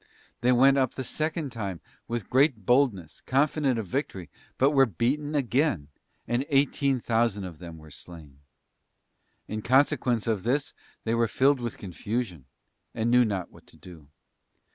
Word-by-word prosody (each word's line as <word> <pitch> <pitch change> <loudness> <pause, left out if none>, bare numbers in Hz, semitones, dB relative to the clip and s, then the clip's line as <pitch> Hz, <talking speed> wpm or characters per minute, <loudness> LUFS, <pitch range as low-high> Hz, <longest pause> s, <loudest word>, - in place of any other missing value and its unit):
They 125 +2 +2
went 135 +3 +5
up 130 -2 0
the 130 - -4
second 155 +2 -2
time 100 -7 -5 0.3
with 120 -4 -4
great 130 -6 +2
boldness, 120 - +1
confident 140 -1 +1
of 110 - -3
victory, 95 - -4 0.3
but 135 +2 +4
were 135 -2 +5
beaten 140 - -1
again, 125 - 0 0.4
and 120 +2 0
eighteen 140 -1 +2
thousand 115 -3 0
of 90 -4 -8
them 85 -2 -9
were 80 -1 -14
slain. 75 -4 -12 1.1
In 110 0 -4
consequence 130 -2 +2
of 110 -4 0
this 135 +6 -1 0.3
they 115 - -1
were 115 0 +2
filled 135 +4 +2
with 120 -2 -5
confusion, 95 - -4 0.5
and 115 +1 0
knew 125 0 +6
not 100 -5 -3
what - - -18
to - - -17
do. 80 -2 -14
120 Hz, 155 wpm, -27 LUFS, 95-135 Hz, 1.1 s, knew